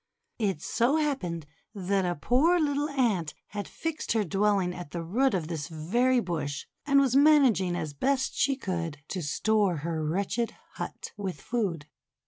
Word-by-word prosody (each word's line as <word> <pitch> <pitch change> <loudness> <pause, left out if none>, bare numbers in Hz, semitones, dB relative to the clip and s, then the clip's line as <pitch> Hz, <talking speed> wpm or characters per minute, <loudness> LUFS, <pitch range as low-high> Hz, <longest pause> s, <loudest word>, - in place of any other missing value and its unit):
It 195 -8 -1
so 240 +6 +2
happened 230 - -1 0.3
that 195 0 0
a 175 - 0
poor 280 - +3
little 290 -1 +1
Ant 225 - 0
had 205 -1 -5
fixed 325 -6 -3
her 220 -2 +2
dwelling 195 -1 +1
at 175 -4 -8
the 170 +2 -4
root 235 +8 +2
of 165 -4 -2
this 160 -4 -4
very 235 +11 +1
bush, 160 -8 -3 0.2
and 280 -1 +5
was 265 -2 +2
managing 270 - +5
as 155 -4 -3
best 265 - 0
she 275 - +2
could 170 - -3
to 185 - -3
store 200 +5 +1
her 160 -2 -1
wretched 200 +8 -1 0.2
hut - - -6
with 190 -7 -4
food. 185 - -2
200 Hz, 160 wpm, -28 LUFS, 170-260 Hz, 0.3 s, and